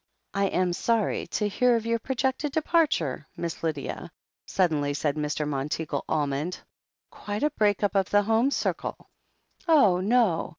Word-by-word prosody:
"I 200 Hz, 0 st, +1 dB
am 180 Hz, -1 st, 0 dB
sorry 225 Hz, +3 st, 0 dB
to 210 Hz, -, -1 dB
hear 245 Hz, +4 st, +3 dB
of 230 Hz, -1 st, -2 dB
your 230 Hz, 0 st, 0 dB
projected 265 Hz, +3 st, -1 dB
departure, 295 Hz, -, +1 dB
Miss 170 Hz, -1 st, -4 dB
Lydia/' 155 Hz, -4 st, -3 dB, 0.4 s
suddenly 150 Hz, -6 st, +1 dB
said 145 Hz, -1 st, -1 dB
Mr. 150 Hz, 0 st, -2 dB
Monteagle 145 Hz, +1 st, -3 dB
Almond. 150 Hz, +3 st, -1 dB, 0.5 s
"Quite 205 Hz, +3 st, -5 dB
a 300 Hz, -, +2 dB
break 210 Hz, -6 st, +1 dB
up 205 Hz, -, +1 dB
of 195 Hz, -2 st, +1 dB
the 205 Hz, 0 st, +4 dB
home 225 Hz, +5 st, +2 dB
circle." -, -, -3 dB, 0.6 s
"Oh, 240 Hz, -, +5 dB
no!" 210 Hz, -3 st, +2 dB
195 Hz, 145 wpm, -26 LUFS, 155-230 Hz, 0.6 s, Oh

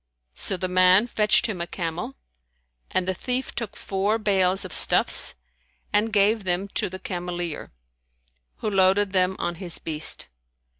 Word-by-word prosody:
So 190 Hz, -, -3 dB
the 185 Hz, -, -2 dB
man 185 Hz, +3 st, +5 dB
fetched 215 Hz, -3 st, +2 dB
him 200 Hz, -6 st, -3 dB
a 170 Hz, -, -3 dB
camel, 165 Hz, -6 st, -5 dB, 0.7 s
and 185 Hz, -1 st, -1 dB
the 190 Hz, -, +1 dB
thief 250 Hz, +7 st, -3 dB
took 230 Hz, -4 st, -5 dB
four 200 Hz, +3 st, -1 dB
bales[FN#157] 195 Hz, -3 st, +2 dB
of 180 Hz, -, -8 dB
stuffs -, -, +4 dB, 0.6 s
and 215 Hz, +2 st, +2 dB
gave 210 Hz, +1 st, +2 dB
them 185 Hz, +2 st, -2 dB
to -, -, -2 dB
the 185 Hz, -, -7 dB
cameleer, 175 Hz, -3 st, -5 dB, 0.9 s
who 215 Hz, -, -3 dB
loaded 195 Hz, +1 st, +3 dB
them 185 Hz, 0 st, +2 dB
on 175 Hz, 0 st, -2 dB
his 175 Hz, -3 st, -4 dB
beast. 155 Hz, -1 st, -1 dB
190 Hz, 150 wpm, -24 LUFS, 180-205 Hz, 0.9 s, man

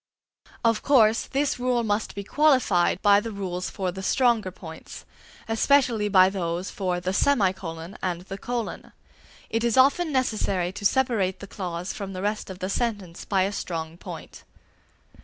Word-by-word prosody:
Of 230 Hz, -2 st, +3 dB
course, 230 Hz, -5 st, +4 dB
this 280 Hz, -1 st, -1 dB
rule 245 Hz, -1 st, +1 dB
must 210 Hz, 0 st, -1 dB
be 200 Hz, -, -4 dB
qualified 235 Hz, -, +3 dB
by 205 Hz, 0 st, +6 dB
the 225 Hz, +2 st, -5 dB
rules 185 Hz, -3 st, -4 dB
for 190 Hz, -3 st, -3 dB
the 190 Hz, +2 st, -7 dB
stronger 235 Hz, -1 st, +2 dB
points, 160 Hz, -3 st, -11 dB, 0.4 s
especially 225 Hz, -2 st, +2 dB
by 185 Hz, -2 st, +6 dB
those 180 Hz, -1 st, -3 dB
for 180 Hz, -3 st, -2 dB
the 185 Hz, +1 st, -2 dB
semicolon 190 Hz, -8 st, 0 dB
and 175 Hz, -2 st, -2 dB
the 195 Hz, +2 st, -8 dB
colon. 240 Hz, 0 st, -5 dB, 0.6 s
It 225 Hz, +1 st, 0 dB
is 235 Hz, 0 st, +1 dB
often 285 Hz, +6 st, +4 dB
necessary 205 Hz, -9 st, 0 dB
to 200 Hz, +1 st, -8 dB
separate 215 Hz, -8 st, 0 dB
the -, -, -8 dB
clause 180 Hz, -2 st, -5 dB
from 195 Hz, -2 st, -6 dB
the 185 Hz, +1 st, -5 dB
rest 210 Hz, 0 st, -2 dB
of 190 Hz, -, -7 dB
the 185 Hz, 0 st, -3 dB
sentence 205 Hz, -6 st, -3 dB
by 195 Hz, -2 st, +2 dB
a 195 Hz, -, -1 dB
strong 165 Hz, -4 st, -4 dB
point. 175 Hz, -, -10 dB
200 Hz, 160 wpm, -25 LUFS, 185-235 Hz, 0.6 s, by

